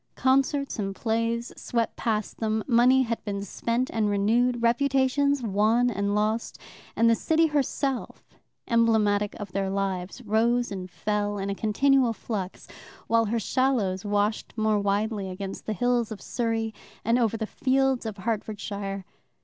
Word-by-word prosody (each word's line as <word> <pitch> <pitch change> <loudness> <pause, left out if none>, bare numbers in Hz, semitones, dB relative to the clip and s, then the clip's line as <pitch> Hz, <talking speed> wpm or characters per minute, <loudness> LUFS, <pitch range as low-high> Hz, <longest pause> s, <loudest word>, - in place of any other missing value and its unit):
Concerts 275 0 +1
and 195 -1 -2
plays 230 +2 -1
swept 230 -2 -2
past 215 -2 -2
them, 220 -1 0
money 255 +1 +5
had 230 -2 -3
been 200 -1 -3
spent 235 +5 -1
and 215 -2 +1
renewed, 235 +4 +2
reputations 275 +2 +2
won 225 +4 +2
and 200 -1 -1
lost, 215 +2 -1 0.4
and 230 - +4
the 230 - +6
city 320 +7 +2
herself, 280 -3 -1 0.4
emblematic 220 -3 +2
of 205 -3 -6
their 195 0 -1
lives, 195 0 -2
rose 235 +2 +1
and 185 -2 -5
fell 205 +2 -2
in 200 0 -2
a - - 0
continual 245 +4 +2
flux, 200 -5 -5 0.4
while 230 0 +3
her 230 +2 0
shallows 220 -6 0
washed 205 +2 -1
more 215 -1 +2
widely 200 0 -1
against 190 +1 -6
the 215 - 0
hills 240 +1 +1
of 215 - -6
Surrey 225 -2 -2 0.3
and 230 +3 +3
over 225 -2 +1
the 220 - -2
fields 265 +2 +1
of 215 -2 -5
Hertfordshire. 200 -2 -4
225 Hz, 150 wpm, -26 LUFS, 205-245 Hz, 0.4 s, the